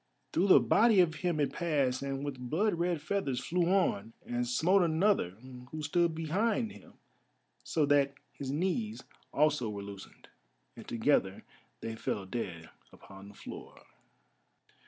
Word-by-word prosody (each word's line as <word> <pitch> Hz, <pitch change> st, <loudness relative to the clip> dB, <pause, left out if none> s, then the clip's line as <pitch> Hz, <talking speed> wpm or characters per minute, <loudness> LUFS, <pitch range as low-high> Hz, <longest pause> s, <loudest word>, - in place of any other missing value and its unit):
Through 185 Hz, +4 st, +2 dB
the 190 Hz, -, +8 dB
body 220 Hz, -3 st, +4 dB
of 175 Hz, -3 st, +4 dB
him 175 Hz, -4 st, 0 dB
it 145 Hz, -, 0 dB
passed 140 Hz, -7 st, 0 dB
and 140 Hz, 0 st, -3 dB
with 140 Hz, -3 st, -5 dB
blood 205 Hz, -, +2 dB
red 170 Hz, -2 st, -1 dB
feathers 150 Hz, -7 st, -1 dB
flew 175 Hz, +6 st, 0 dB
on, 175 Hz, -, +1 dB
and 120 Hz, 0 st, -2 dB
smote 180 Hz, +10 st, +3 dB
another 165 Hz, -, +2 dB, 0.3 s
who 155 Hz, +1 st, -6 dB
stood 170 Hz, +2 st, +1 dB
behind 210 Hz, +8 st, 0 dB
him -, -, -15 dB, 0.7 s
so 155 Hz, -3 st, +1 dB
that 140 Hz, -1 st, +3 dB, 0.2 s
his 135 Hz, -, -6 dB
knees 190 Hz, -, -1 dB, 0.3 s
also 150 Hz, -6 st, +2 dB
were 100 Hz, -1 st, -5 dB
loosened, 100 Hz, -1 st, -11 dB, 0.5 s
and -, -, -11 dB
together 110 Hz, -5 st, +1 dB, 0.4 s
they 115 Hz, 0 st, -4 dB
fell 100 Hz, -3 st, -3 dB
dead 90 Hz, -6 st, -5 dB, 0.2 s
upon 95 Hz, 0 st, -13 dB
the 100 Hz, -, -14 dB
floor. -, -, -10 dB
150 Hz, 145 wpm, -31 LUFS, 120-180 Hz, 0.7 s, the